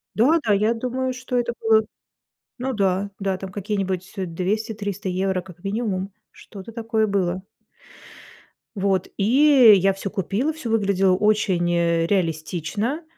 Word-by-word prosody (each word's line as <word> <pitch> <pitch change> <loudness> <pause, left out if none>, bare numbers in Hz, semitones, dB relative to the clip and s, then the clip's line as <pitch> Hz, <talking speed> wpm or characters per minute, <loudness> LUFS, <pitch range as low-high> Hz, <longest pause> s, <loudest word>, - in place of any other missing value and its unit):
Да, 295 +9 +4
да, 210 - +3
я 215 +3 +2
думаю, 255 +2 -2
что 255 0 -3
это 240 -1 0
было. 220 -1 +3 0.7
Ну 265 +1 -3
да, 200 -2 0
да 195 -1 -1
там 190 0 -8
какие-нибудь 190 -2 -3
200-300 200 +2 -3
евро 185 0 -1
как 180 -2 -15
минимум, 195 -2 -2 0.2
что-то 200 +2 -12
такое 225 -1 0
было. 185 -2 -1 1.3
Вот 195 -2 0
и 255 +2 +6
я 195 0 +3
всё 195 +1 -5
купила, 205 - -1
все 305 -7 -6
выглядело 195 -4 +2
очень, 195 -4 +1
э, 170 -1 +1
реалистично, 185 - -2
200 Hz, 130 wpm, -23 LUFS, 185-225 Hz, 1.3 s, и